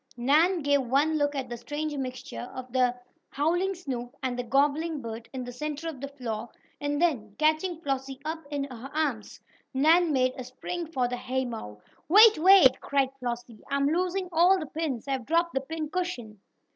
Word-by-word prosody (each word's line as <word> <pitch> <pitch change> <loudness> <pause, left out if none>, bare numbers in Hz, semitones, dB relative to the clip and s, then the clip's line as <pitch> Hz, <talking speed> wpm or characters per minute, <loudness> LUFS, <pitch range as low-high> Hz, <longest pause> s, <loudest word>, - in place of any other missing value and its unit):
Nan 310 +8 +3
gave 285 0 +3
one 280 +5 +2
look 290 0 +1
at 265 -2 -3
the 240 -1 -6
strange 295 +5 -4
mixture 255 -2 -6
of 255 -1 -8
the 250 -1 +3 0.3
howling 350 +7 0
Snoop 250 -8 -6
and 255 -1 -1
the 245 - -2
gobbling 290 +5 +1
bird 225 -2 -7
in 260 -2 -5
the 245 - -7
centre 300 +4 -5
of 295 -6 -6
the 280 - -3
floor, 240 -5 -5 0.3
and 290 0 -1
then, 240 -12 0
catching 315 +3 +1
Flossie 270 -2 -3
up 320 +1 -3
in 290 -1 -2
her 260 -1 -8
arms, 280 -9 -2 0.4
Nan 320 +5 +4
made 255 -2 +2
a - - -4
spring 335 +7 -5
for 260 -6 0
the 245 0 -3
haymow. 245 - -4 0.3
"Wait! 425 +1 +8
Wait!" 340 -7 +7
cried 275 -2 +1
Flossie. 240 -3 -5
"I'm 280 0 +2
losing 365 +3 0
all 350 +3 +5
the 330 - -4
pins! 285 -5 -4
I've 265 -4 -2
dropped 335 +2 +2
the 270 - 0
pin 315 +2 -4
cushion!" 255 - -4
280 Hz, 185 wpm, -27 LUFS, 250-320 Hz, 0.4 s, Wait